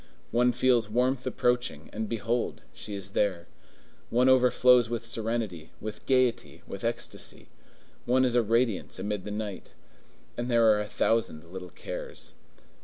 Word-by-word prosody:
One 125 +1 +4
feels 120 -3 +2
warmth 125 +3 +1
approaching, 125 - 0
and 110 0 -3
behold! 115 +1 -1
she 105 - -7
is 100 0 -5
there. 95 -5 0 0.6
One 125 +2 +4
overflows 125 -2 +5
with 115 -1 -3
serenity, 115 -8 -3
with 110 0 -7
gayety, 130 -2 +1
with - - -8
ecstasy; - - -3 0.6
one 130 +1 +3
is 125 - +1
a 120 - +5
radiance 115 -1 0
amid 105 -2 -3
the - - -5
night. 105 -2 -5 0.6
And 120 +1 -2
there 115 -1 +4
are 105 -1 +2
a 105 - -4
thousand 110 -9 0
little 90 -1 -7
cares. - - -7
115 Hz, 145 wpm, -28 LUFS, 105-125 Hz, 0.6 s, overflows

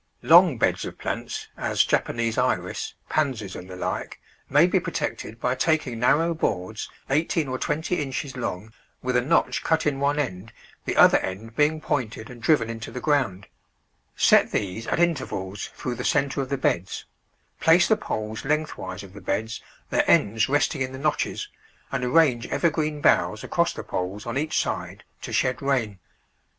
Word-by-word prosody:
Long 170 -4 +7
beds - - +1
of - - -7
plants— - - -4
as - - +1
Japanese 115 -1 0
Iris, - - -1
Pansies, 125 -11 -1
and 90 - -9
the 90 - -7
like 90 - -4 0.2
— - - -37
maybe - - +5
protected 115 - -4
by 125 +1 +1
taking 130 -4 0
narrow 165 +8 +3
boards 110 - -2 0.2
eighteen 155 +1 +1
or 130 0 -3
twenty 160 +3 -1
inches 135 0 -4
long, 110 -3 -4 0.3
with 125 0 -1
a 125 - +4
notch 145 +7 +1
cut 160 -1 +1
in 140 -2 0
one 140 +1 +1
end, 115 -6 -3 0.3
the - - -1
other - - +7
end 110 +5 -6
being 150 +3 +2
pointed 120 -5 -3
and 120 -2 -11
driven 115 -3 +3
into 115 0 -6
the 125 - -6
ground; 125 -11 0 0.7
set - - +5
these 105 +3 -2
at - - 0
intervals 130 - -1
through 125 - -3
the - - -5
centre 140 -1 +1
of 130 - -5
the 140 - 0
beds; 95 -7 -1 0.5
place 170 +2 +5
the 220 - +4
poles 110 - -4
lengthwise 145 -11 -2
of 95 -1 -12
the 100 - -10
beds, 110 +4 -2 0.3
their - - +3
ends 110 +5 +3
resting 145 0 +1
in 130 0 -2
the - - -6
notches, 150 +2 -1 0.4
and 135 -2 -2
arrange 125 -3 +3
evergreen 155 -3 0
boughs - - +3
across - - +1
the - - -7
poles 95 +3 -4
on 120 - -4
each 155 +3 0
side - - -3 0.2
to - - -6
shed 125 0 +1
rain. 120 -8 0
130 Hz, 170 wpm, -25 LUFS, 110-150 Hz, 0.7 s, Long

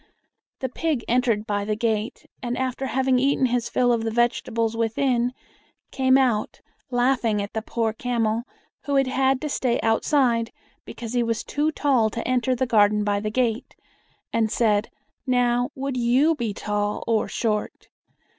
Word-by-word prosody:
The 260 - -2
pig 295 -2 -2
entered 235 -3 +1
by 205 -1 -1
the 210 +1 -1
gate, 220 +1 -2 0.2
and, 245 -1 -3
after 260 +1 -2
having 260 0 +1
eaten 270 0 +2
his 245 -1 0
fill 245 -1 +2
of 230 -1 0
the 225 - -1
vegetables 230 -1 0
within, 235 +2 +1 0.6
came 260 -1 +3
out, 245 -6 0 0.3
laughing 245 -3 +1
at 200 0 -4
the 220 - -2
poor 225 0 -1
camel, 230 -1 -1 0.4
who 285 - -1
had 270 0 +4
had 265 0 +1
to 305 - -2
stay 255 -4 0
outside, 230 0 +2 0.3
because 230 -1 -7
he 245 - +2
was 230 -2 -1
too 300 +2 -1
tall 265 -8 +2
to 230 - -5
enter 255 0 +1
the 260 +1 0
garden 210 -3 +3
by 205 -1 0
the 215 +1 -3
gate, 235 +1 -1 0.6
and 220 -2 +1
said, 215 -2 +1 0.4
"Now, 245 -1 +2
would 275 0 -3
you 255 +6 +3
be 240 -8 -3
tall 205 0 -2
or 225 -2 +1
short?" 215 -3 -3
240 Hz, 165 wpm, -24 LUFS, 220-260 Hz, 0.6 s, had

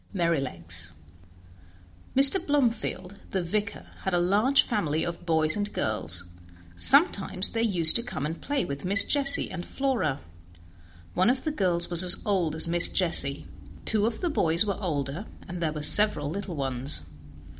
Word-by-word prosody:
09 170 -3 -1
Merrylegs 90 - -3 1.2
Mr. 275 +7 +5
Blomefield, 230 -9 -3
the 190 -2 -4
vicar, 205 +4 -5
had 190 -2 -3
a - - +1
large 210 +10 +1
family 160 - -3
of 175 0 -8
boys 160 -1 +1
and 205 0 -4
girls; 90 -5 -4 0.5
sometimes 200 - +4
they 225 - -3
used 180 -8 +7
to - - -3
come 235 -11 -7
and 160 +2 -7
play 285 -1 -3
with 140 0 -8
Miss 200 +2 +6
Jessie 280 -1 0
and 180 -2 -7
Flora. 255 - -3 0.9
One 185 +4 +1
of 260 +1 -2
the 310 - -3
girls 180 - -2
was 170 -1 +8
as 180 -1 +5
old 180 -7 -1
as 160 - -4
Miss 170 +1 +5
Jessie; 150 -6 0 0.4
two 215 -1 0
of 230 - -6
the 350 -3 -2
boys 170 - 0
were 200 -1 -4
older, 155 +1 -5 0.2
and 175 0 -8
there 160 -2 -2
were 150 -1 -4
several 155 -5 +3
little 195 -1 -7
ones. 135 - -5
180 Hz, 165 wpm, -25 LUFS, 155-215 Hz, 1.2 s, was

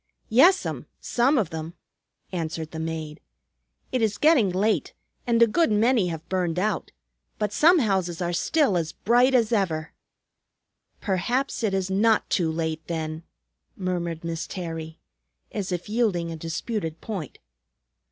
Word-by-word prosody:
"Yes'm, 345 - +4
some 265 +5 +2
of 205 -9 0
them," 160 +1 -6 0.6
answered 160 -3 -4
the 160 - -6
maid. 160 -2 -5 0.7
"It 255 - 0
is 215 -2 +1
getting 295 - +4
late, 205 +4 0 0.3
and 235 -1 +3
a - - +8
good 320 +5 +2
many 220 -1 +3
have 165 -2 -5
burned 180 -3 -1
out. 210 +3 -1 0.5
But 210 -1 -1
some 340 - +6
houses 190 - 0
are 175 -1 -1
still 270 - +2
as 160 -2 -2
bright 245 +4 +3
as 235 -2 +3
ever." 170 -8 0 1.1
"Perhaps 240 +9 -1
it 210 -4 +1
is 190 0 -1
not 215 +3 +3
too 165 -4 +2
late, 160 -1 -2
then," 160 -1 -3 0.5
murmured 175 -3 -3
Miss 165 -1 -4
Terry, 165 -3 -6 0.5
as 195 -3 -3
if 180 +1 -3
yielding 205 -7 0
a - - -4
disputed 165 +1 -4
point. 190 - -6
185 Hz, 140 wpm, -25 LUFS, 165-225 Hz, 1.1 s, a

